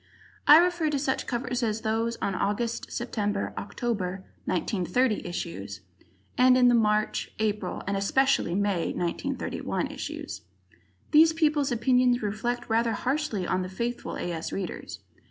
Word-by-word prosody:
I 300 - +11
refer 345 -2 +3
to 295 - 0
such 270 -1 -1
covers 250 0 -2
as 220 -2 -1
those 225 +1 -1
on 200 - +1
the - - -3
August, 230 +4 -1
September, 205 -4 -2
October, 195 -4 -3 0.2
1930, 205 +5 0
issues, 100 - -5 0.6
and 255 0 +7
the 250 -1 +5
March, 215 -2 +1
April, 210 -3 -2
and 200 - -1
especially 200 -1 +2
May, 200 -4 0
1931, 220 +10 -2
issues. - - -6 0.7
These 320 +1 +7
people's 300 -4 +2
opinions 245 0 +3
reflect 240 +4 -2
rather 230 0 +2
harshly 255 -5 -1
on 185 - 0
the 185 - -4
faithful 235 +6 -4
A. 175 - -3
S. 165 -1 -4
Readers. 190 -3 -5
230 Hz, 135 wpm, -27 LUFS, 200-255 Hz, 0.7 s, I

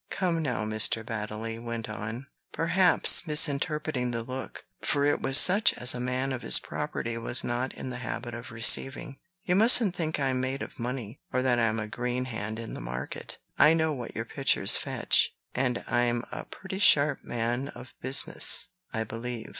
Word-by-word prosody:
"Come, 175 -3 -1
now," 125 -7 -2
Mr. 110 +1 +1
Baddeley 110 +1 -5
went 115 -1 -5
on, 110 +4 -6 0.3
perhaps 180 +1 +3
misinterpreting 150 -3 +1
the 115 -1 -4
look, 130 +2 -8 0.2
for 140 -1 0
it 145 - +1
was 135 +1 +3
such 200 +7 +6
as 125 +1 +3
a 125 - -5
man 130 +2 -2
of 130 - -5
his - - +5
property 115 0 -5
was 120 +2 0
not 120 +2 -2
in 130 - -7
the 125 - -6
habit 120 0 -6
of 120 0 -8
receiving, 135 +4 +2 0.2
"you 180 - 0
mustn't 220 -2 +5
think 160 -2 -3
I'm 130 -2 0
made 130 +1 -3
of - - -11
money, 120 -2 -5
or 130 0 0
that 125 -2 +1
I'm 115 -1 +1
a 110 - -3
green 125 +3 -3
hand 110 -3 -5
in 115 -1 -7
the - - -7
market. 60 +2 -7 0.2
I 155 +2 +6
know 160 -1 0
what 125 -4 -8
your 115 - -4
pictures 135 -6 +2
fetch; - - +2 0.2
and 125 -1 -1
I'm 120 0 0
a - - -7
pretty 190 0 -8
sharp 150 -9 +4
man 120 +3 -3
of 125 -2 -12
business, 135 +4 +3 0.2
I 110 -1 -2
believe. 115 +1 -7
125 Hz, 180 wpm, -27 LUFS, 115-140 Hz, 0.3 s, such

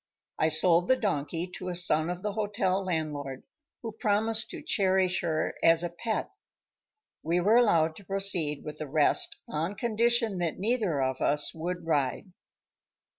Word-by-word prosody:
I 155 - +3
sold 170 +3 +3
the 260 - +4
donkey 165 - -2
to 185 - -5
a 180 - -4
son 165 -2 +3
of 180 +1 -5
the 210 - -2
hotel 205 -2 -1
landlord, 150 -6 -4 0.4
who 225 - -5
promised 220 0 0
to 340 -4 -9
cherish 190 - +1
her 160 -3 -1
as 165 0 +4
a 175 - -3
pet. 220 +6 -4 0.9
We 170 +3 0
were 205 +6 +3
allowed 165 -9 +3
to 200 - -14
proceed 180 -7 +3
with 150 - -8
the 155 - -5
rest 150 +2 +1
on 165 +6 -3
condition 230 -1 +1
that 170 -3 -2
neither 200 - 0
of 130 0 -3
us 145 +1 +1
would 175 +1 -5
ride. 150 +3 -1
180 Hz, 160 wpm, -28 LUFS, 155-205 Hz, 0.9 s, the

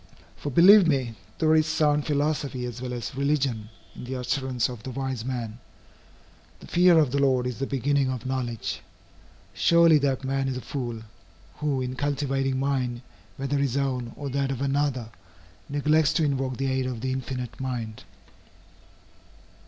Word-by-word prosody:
For, 145 - -5
believe 180 +6 +7
me, 130 -6 +1 0.2
there 155 0 +3
is 155 0 +4
sound 150 -2 +2
philosophy 145 -3 -1
as 120 0 -6
well 125 -1 -4
as 120 0 -4
religion, 135 -6 0 0.2
in - - -9
the 130 +1 -4
utterance 125 -1 -1
of 120 -3 -8
the 130 - -7
wise 130 -2 -3
man, 120 -3 -4 1.0
"The - - -12
fear 175 -1 +5
of 150 -5 +4
the 140 - +1
Lord 130 -3 +2
is 125 -2 -4
the 135 - -1
beginning 140 0 +1
of 130 -1 -4
knowledge." 125 -4 -3 0.7
Surely 170 -2 +5
that 135 -2 0
man 135 0 -1
is 130 -1 -2
a - - -5
fool, 120 -5 -5 0.5
who 145 -3 -1
in 130 0 -3
cultivating 135 -1 -1
mind, 130 -3 -1 0.3
whether 135 +1 -1
his 140 -2 0
own 130 -4 -1
or 145 - -5
that 140 0 0
of 135 -3 -3
another, 140 -4 0 0.6
neglects 150 +1 +2
to 165 - +2
invoke 135 -3 -1
the 135 0 -1
aid 130 -1 0
of 125 -3 -4
the 130 +1 -1
Infinite 130 -2 -4
Mind. 125 -3 -4
135 Hz, 165 wpm, -26 LUFS, 125-145 Hz, 1.0 s, believe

